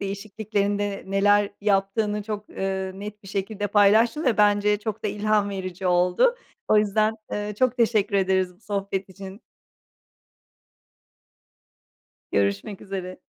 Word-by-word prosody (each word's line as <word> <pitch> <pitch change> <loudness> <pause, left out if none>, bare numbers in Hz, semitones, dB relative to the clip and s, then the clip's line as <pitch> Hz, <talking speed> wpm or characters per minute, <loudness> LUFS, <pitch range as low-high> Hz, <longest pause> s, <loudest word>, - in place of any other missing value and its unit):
değişikliklerinde 200 0 -2
neler 200 +1 +3
yaptığını 205 +1 +1
çok, 210 0 -6
ııı, 190 0 -3
net 210 +1 -8
bir 195 - -12
şekilde 200 +1 -3
paylaştın 215 - +4
ve 245 -4 +2
bence 210 0 +4
çok 220 0 -5
da - - +1
ilham 210 -1 +1
verici 185 -1 -5
oldu. 180 - +3 0.3
O 215 - +5
yüzden, 215 +1 +2 0.2
eee, 210 0 -3
çok 255 -1 +2
teşekkür 215 -4 +2
ederiz 190 -1 +1
bu 195 - -32
sohbet 200 -2 -3
için. 195 +2 -10 2.9
Görüşmek 100 - -1
üzere. 185 -2 -6
205 Hz, 120 wpm, -24 LUFS, 195-210 Hz, 2.9 s, O